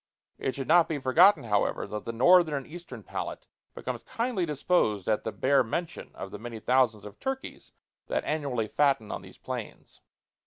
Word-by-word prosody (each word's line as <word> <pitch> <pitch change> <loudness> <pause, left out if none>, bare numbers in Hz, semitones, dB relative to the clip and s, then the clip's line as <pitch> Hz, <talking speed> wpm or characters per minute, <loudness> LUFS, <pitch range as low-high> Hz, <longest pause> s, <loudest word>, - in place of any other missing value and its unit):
It 130 - -2
should 135 -2 -4
not 170 +1 +5
be 155 - -1
forgotten, 155 +9 +5
however, 105 -3 0
that 105 0 -6
the - - -2
Northern 160 +6 +5
and 135 -2 -4
Eastern 175 +2 -10
palate - - -5 0.3
becomes - - -5
kindly 230 -7 -2
disposed 140 - +1
at 110 -1 +1
the 110 - -3
bare 130 +6 +3
mention 165 +9 -4
of 95 - -7
the 105 - -7
many 115 0 -7
thousands 120 -4 +2
of 105 0 -11
turkeys 265 0 -5 0.3
that - - -1
annually 140 -7 -1
fatten 135 -5 +1
on - - -4
these - - -14
plains. - - -8
135 Hz, 180 wpm, -28 LUFS, 110-170 Hz, 0.3 s, not